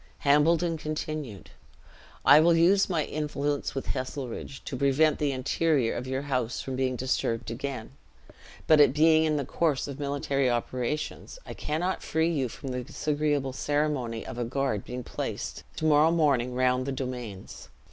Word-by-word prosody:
Hambledon 160 +3 +3
continued, 155 -7 -5 0.7
"I 140 +2 +9
will 165 +2 +5
use 190 +5 +4
my 165 -5 0
influence 145 -2 -2
with 135 - -4
Heselrigge, 130 0 -5
to - - -4
prevent 140 +3 +3
the 145 -2 +1
interior 135 -1 +1
of 125 - -5
your 130 +1 -2
house 125 -4 -1
from 130 - -4
being 130 -1 0
disturbed 115 -3 -1
again; 130 -1 -5 0.7
but 155 -1 +5
it 145 -1 +5
being 160 +1 +5
in 155 -1 +1
the 140 - -2
course 150 -3 0
of 140 0 -7
military 140 -2 0
operations, 125 - -3
I - - -7
cannot 175 +5 -2
free 160 +1 0
you 135 -6 -1
from 135 - -8
the 125 0 -3
disagreeable 145 -1 -1
ceremony 140 -5 -1
of 120 - -7
a - - 0
guard 120 -4 -1
being 125 0 -6
placed - - -5
to 155 - -3
morrow 155 +1 +5
morning 140 -7 +2
round 130 0 +1
the - - -1
domains. 125 -7 -6
140 Hz, 160 wpm, -27 LUFS, 125-155 Hz, 0.7 s, I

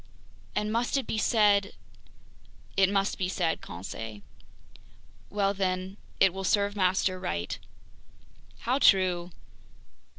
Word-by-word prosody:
And 210 0 0
must 235 +4 +1
it 270 - -1
be 220 - -2
said... 205 -3 +3 0.5
?" - - -27
"It 195 -1 +4
must 195 +1 0
be 185 -1 0
said, 175 -3 -1
Conseil." 105 +4 -7 1.1
"Well 200 -1 +1
then, 185 -1 -2 0.2
it 195 -2 +5
will 195 0 -5
serve 205 +1 +1
master 185 -1 +1
right!" 85 - -3 1.0
"How 255 +4 +1
true!" 180 -6 +4
195 Hz, 120 wpm, -28 LUFS, 185-205 Hz, 1.1 s, it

